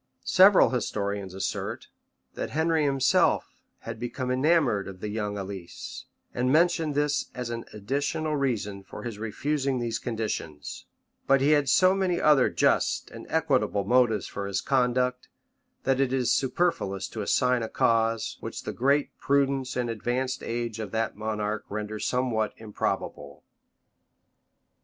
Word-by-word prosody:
Several 190 +2 +6
historians 100 -6 -2
assert, 95 0 -4 0.4
that - - -4
Henry 160 0 +1
himself 135 -2 +2 0.3
had - - -7
become 125 +1 -3
enamored 130 -6 +2
of 95 -1 -10
young 105 -1 -3
Alice, 95 -3 -7 0.3
and 125 +1 +1
mention 165 0 +3
this 145 0 0
as 125 -2 -4
an 115 0 -5
additional 140 +8 -2
reason 110 -8 -1
for 95 - -10
his 115 -4 -6
refusing 135 +5 -1
these 115 -2 -2
conditions; 100 - -4 0.4
but 135 0 +5
he 140 +3 +3
had 145 -3 +3
so 185 +7 +5
many 185 -3 0
other 150 -4 +5
just - - +1
and - - -10
equitable 100 - +1
motives 115 -2 +3
for 100 -1 -5
his 100 -1 -1
conduct, 125 -1 +1 0.6
that 135 0 +1
it 135 -2 +2
is 130 -2 +2
superfluous 130 - 0
to 110 - -6
assign 125 +4 +2
a 110 - -3
cause, 115 -1 +1
which - - -6
the - - -4
great 140 +3 +1
prudence 140 -2 +1
and 125 -1 0
advanced 125 +3 -2
age 115 -1 -3
of 110 -2 -4
that 110 +1 -1
monarch 105 0 -2
render 105 +1 -4
somewhat 120 -4 0
improbable. 110 -2 -4
125 Hz, 140 wpm, -27 LUFS, 105-140 Hz, 0.6 s, Several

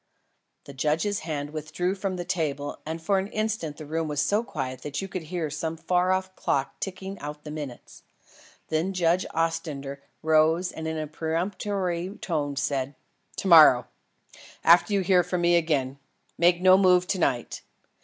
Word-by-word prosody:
The 140 - -11
judge's 160 +9 0
hand 145 -2 -4
withdrew 155 +4 -2
from 195 -1 -3
the 175 -1 -5
table 145 -5 -2
and 160 +1 -3
for 190 +4 +1
an 190 - -3
instant 215 -9 -2
the 155 - -8
room 160 +2 -2
was 150 -1 -2
so 205 +9 +2
quiet 130 - -5
that 145 -1 -4
you 195 - -4
could 185 -1 -5
hear 160 -1 -4
some 160 +2 -3
far 180 +2 +1
off 185 0 -1
clock 135 0 -1
ticking 190 0 -6
out 150 +1 -7
the 150 - -7
minutes. 145 -5 -8 0.7
Then 160 +5 0
Judge 175 0 +1
Ostrander 155 -4 -2 0.2
rose 160 +3 +3
and 160 0 -6
in 160 0 -2
a 155 - -2
peremptory 180 +4 -2
tone 145 -5 -2
said: 140 -1 -2 0.4
"To - - -3
morrow. 155 -8 +8 0.8
After 175 +3 +6
you 200 -1 +2
hear 185 -1 +4
from 180 0 -2
me 175 0 +4
again. 140 -5 0 0.4
Make 175 +1 +3
no 185 0 +7
move 180 -2 +5
to 190 - -1
night. 125 -7 -1
165 Hz, 170 wpm, -26 LUFS, 150-185 Hz, 0.8 s, morrow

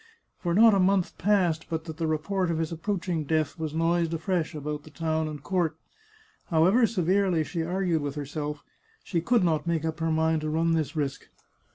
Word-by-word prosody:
For 170 -1 0
not 225 +1 +7
a 195 - +3
month 190 -1 +1
passed 180 -6 +2
but 160 -1 -2
that 160 -2 -7
the 165 -1 -1
report 170 +4 -1
of 165 - 0
his 160 0 -2
approaching 170 -1 -2
death 155 +1 -1
was 160 -2 -2
noised 165 0 +1
afresh 165 0 -1
about 150 0 -4
the 155 - -14
town 160 0 -1
and 150 -2 -7
court. 175 -4 0 0.7
However 185 +9 +4
severely 185 -4 +1
she 165 +2 -3
argued 175 -1 0
with 145 0 -4
herself, 150 0 -4 0.4
she 170 -3 -1
could 235 +3 +2
not 165 -1 +1
make 165 -2 0
up 160 0 -3
her 165 0 0
mind 160 0 +1
to 155 - -2
run 165 +2 +1
this 155 -1 -1
risk. 140 -3 -3
165 Hz, 195 wpm, -27 LUFS, 155-180 Hz, 0.7 s, not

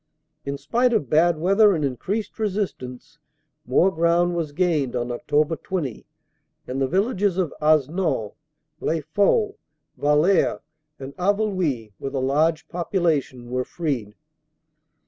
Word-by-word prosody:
"In 140 0 -3
spite 240 - +1
of 145 - 0
bad 165 +2 +4
weather 195 +4 +4
and 150 -3 0
increased 190 - -3
resistance 150 - -4 0.5
more 170 +9 +4
ground 170 +1 +2
was 165 -3 -2
gained 150 -6 0
on 120 0 -2
Oct. 150 +6 0
20, 155 - -4 0.6
and 130 +2 -3
the 135 - +2
villages 195 - +1
of 180 -5 0
Hasnon, 150 - +1 0.5
Les 160 0 -1
Faux, 410 - +1 0.4
Wallers 150 +6 +3 0.4
and 135 0 -9
Haveluy, 185 - 0
with 135 +1 -5
a - - +1
large 155 +5 +1
population, 155 -9 -1
were 125 0 0
freed. 125 -11 -3
160 Hz, 125 wpm, -23 LUFS, 135-185 Hz, 0.6 s, bad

